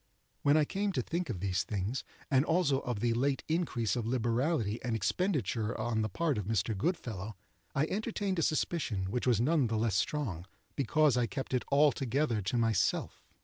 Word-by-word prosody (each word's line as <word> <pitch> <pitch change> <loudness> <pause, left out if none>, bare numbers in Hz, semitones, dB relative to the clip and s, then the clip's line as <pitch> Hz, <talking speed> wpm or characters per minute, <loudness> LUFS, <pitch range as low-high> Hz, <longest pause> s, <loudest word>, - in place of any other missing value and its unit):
When 145 +2 +4
I 155 - +4
came 200 +5 -1
to 130 - 0
think 170 +4 -3
of 90 - -4
these 95 -1 0
things, 105 +5 -3 0.3
and 135 0 +5
also 160 -4 +2
of 125 -6 -4
the 120 -1 +2
late 135 +3 0
increase 155 - 0
of 120 -3 -2
liberality 120 -1 0
and 120 -2 -1
expenditure 115 - 0
on 110 0 0
the 110 - -1
part 155 - 0
of 100 - -4
Mr. 110 0 0
Goodfellow, 110 - -3 0.4
I 140 - +3
entertained 200 -1 -2
a - - +2
suspicion 130 - 0
which 125 +2 -1
was 120 -4 +4
none 140 +1 +3
the 110 0 -1
less 110 -1 +1
strong 100 - -1 0.3
because 140 0 +3
I 120 -1 +2
kept 135 +2 -5
it 125 - +1
altogether 140 -4 +2
to 100 +6 -1
myself. 115 -4 +1
125 Hz, 185 wpm, -32 LUFS, 110-150 Hz, 0.4 s, and